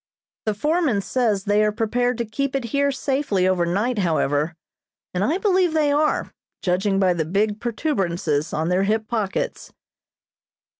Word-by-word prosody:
The 215 Hz, -, +1 dB
foreman 300 Hz, -, +1 dB
says 215 Hz, -3 st, 0 dB
they 205 Hz, +1 st, +2 dB
are 210 Hz, -, +2 dB
prepared 240 Hz, +3 st, 0 dB
to 235 Hz, -, -1 dB
keep 275 Hz, +5 st, -2 dB
it 270 Hz, -, 0 dB
here 280 Hz, 0 st, +2 dB
safely 265 Hz, -8 st, 0 dB
over 180 Hz, -2 st, +1 dB
night, 210 Hz, +6 st, 0 dB
however, 160 Hz, -3 st, 0 dB, 0.6 s
and 180 Hz, +1 st, 0 dB
I 305 Hz, -, +1 dB
believe 375 Hz, -4 st, +2 dB
they 300 Hz, -2 st, +3 dB
are, 300 Hz, +1 st, +1 dB, 0.3 s
judging 195 Hz, +2 st, +1 dB
by 185 Hz, -2 st, +3 dB
the 165 Hz, -2 st, -1 dB
big 205 Hz, +6 st, 0 dB
protuberances 185 Hz, -, -1 dB
on 160 Hz, +2 st, -1 dB
their 180 Hz, +1 st, +2 dB
hip 220 Hz, +1 st, 0 dB
pockets." 215 Hz, -4 st, -3 dB
215 Hz, 155 wpm, -22 LUFS, 185-265 Hz, 0.6 s, they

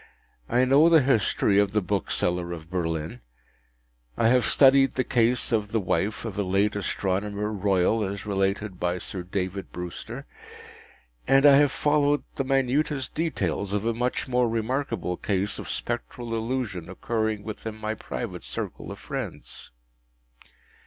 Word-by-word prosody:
I 125 Hz, +2 st, +3 dB
know 140 Hz, +6 st, +6 dB
the 160 Hz, -4 st, +6 dB
history 110 Hz, -5 st, +2 dB
of 100 Hz, -1 st, +1 dB
the 105 Hz, -, +3 dB
Bookseller 90 Hz, -2 st, -1 dB
of 85 Hz, 0 st, -10 dB
Berlin, 80 Hz, -7 st, -3 dB, 1.0 s
I 115 Hz, -, +4 dB
have 125 Hz, -2 st, +4 dB
studied 135 Hz, -1 st, +5 dB
the 130 Hz, -, 0 dB
case 125 Hz, -1 st, +1 dB
of 105 Hz, -2 st, 0 dB
the 115 Hz, -, +1 dB
wife 105 Hz, +3 st, -1 dB
of 105 Hz, -3 st, -5 dB
a -, -, +2 dB
late 100 Hz, +3 st, +1 dB
Astronomer 100 Hz, +1 st, -2 dB
Royal 100 Hz, +1 st, +1 dB
as 100 Hz, +1 st, -4 dB
related 100 Hz, -1 st, -1 dB
by 90 Hz, 0 st, 0 dB
Sir 90 Hz, +1 st, -5 dB
David 95 Hz, +1 st, -4 dB
Brewster, 90 Hz, -1 st, -7 dB, 1.0 s
and 135 Hz, +2 st, +5 dB
I 140 Hz, -1 st, +8 dB
have 145 Hz, -1 st, +4 dB
followed 145 Hz, -1 st, +2 dB
the 135 Hz, -, -1 dB
minutest 135 Hz, +1 st, 0 dB
details 100 Hz, -, -1 dB
of 105 Hz, +1 st, -1 dB
a 115 Hz, -, +1 dB
much 125 Hz, +3 st, -2 dB
more 125 Hz, -2 st, +2 dB
remarkable 115 Hz, -5 st, -2 dB
case 100 Hz, 0 st, 0 dB
of -, -, -7 dB
Spectral 115 Hz, -, -4 dB
Illusion 115 Hz, -7 st, -3 dB
occurring 110 Hz, +2 st, -2 dB
within 110 Hz, 0 st, -6 dB
my 110 Hz, 0 st, -3 dB
private 105 Hz, -, -6 dB
circle -, -, -5 dB
of -, -, -7 dB
friends. -, -, -7 dB
105 Hz, 145 wpm, -26 LUFS, 95-125 Hz, 1.0 s, I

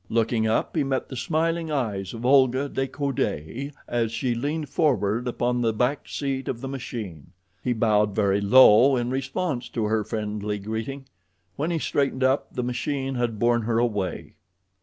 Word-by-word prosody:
Looking 115 Hz, 0 st, +1 dB
up, 110 Hz, -, 0 dB
he 155 Hz, -, +2 dB
met 135 Hz, -1 st, -2 dB
the 130 Hz, -, -6 dB
smiling 165 Hz, +5 st, -1 dB
eyes 110 Hz, -10 st, -2 dB
of 115 Hz, +2 st, -6 dB
Olga 130 Hz, +1 st, +4 dB
de 135 Hz, -1 st, -2 dB
Coude 135 Hz, -, -3 dB, 0.2 s
as 115 Hz, -2 st, 0 dB
she 120 Hz, +2 st, -1 dB
leaned 145 Hz, +6 st, -2 dB
forward 125 Hz, -, +1 dB
upon 120 Hz, 0 st, 0 dB
the 115 Hz, -2 st, +1 dB
back 125 Hz, +6 st, 0 dB
seat 135 Hz, -2 st, -3 dB
of 120 Hz, -, -3 dB
the 135 Hz, -, -5 dB
machine. 115 Hz, -, -7 dB, 0.3 s
He 125 Hz, -, +1 dB
bowed 105 Hz, -3 st, +2 dB
very 100 Hz, -2 st, +2 dB
low 125 Hz, +4 st, +7 dB
in 120 Hz, 0 st, -1 dB
response 135 Hz, +1 st, -2 dB
to 115 Hz, -3 st, -2 dB
her 110 Hz, 0 st, +1 dB
friendly 105 Hz, -1 st, -3 dB
greeting. 110 Hz, +7 st, -5 dB, 0.5 s
When 155 Hz, +4 st, -2 dB
he 170 Hz, -, 0 dB
straightened 140 Hz, -3 st, 0 dB
up 130 Hz, +2 st, +1 dB
the 125 Hz, -, -3 dB
machine 135 Hz, +2 st, -2 dB
had 120 Hz, -3 st, -1 dB
borne 120 Hz, +2 st, +2 dB
her 115 Hz, 0 st, 0 dB
away. 105 Hz, -6 st, -1 dB
120 Hz, 170 wpm, -25 LUFS, 110-135 Hz, 0.5 s, low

